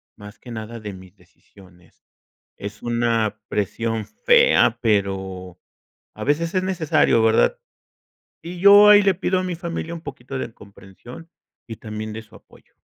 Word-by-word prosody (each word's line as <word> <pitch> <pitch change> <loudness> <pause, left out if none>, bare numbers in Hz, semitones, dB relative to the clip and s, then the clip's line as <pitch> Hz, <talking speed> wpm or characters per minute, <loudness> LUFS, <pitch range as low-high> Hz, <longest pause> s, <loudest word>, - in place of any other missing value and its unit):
más 105 0 -13
que 120 - -13
nada 115 +1 -7
de 105 -2 -7
mis 95 +1 -14
decisiones. 90 -1 -22 0.5
Es 105 +1 -8
una 115 -3 -1
presión 110 +2 -2
fea, 110 +2 +3
pero 95 -4 -2 0.6
a - - -8
veces 165 +5 -1
es 185 - +1
necesario, 160 -10 +1
¿verdad? 110 - +2 0.8
Y 175 +1 -8
yo 205 +1 +8
ahí 205 0 +8
le 195 -1 +2
pido 185 +1 -1
a - - -4
mi 180 -2 -4
familia 170 -1 -5
un 165 - -8
poquito 135 -2 -8
de 120 -3 -5
comprensión 100 - -14 0.4
y 115 -2 -8
también 110 0 -7
de 110 - -7
su 110 - -22
apoyo. - - -22
115 Hz, 155 wpm, -21 LUFS, 105-165 Hz, 0.8 s, yo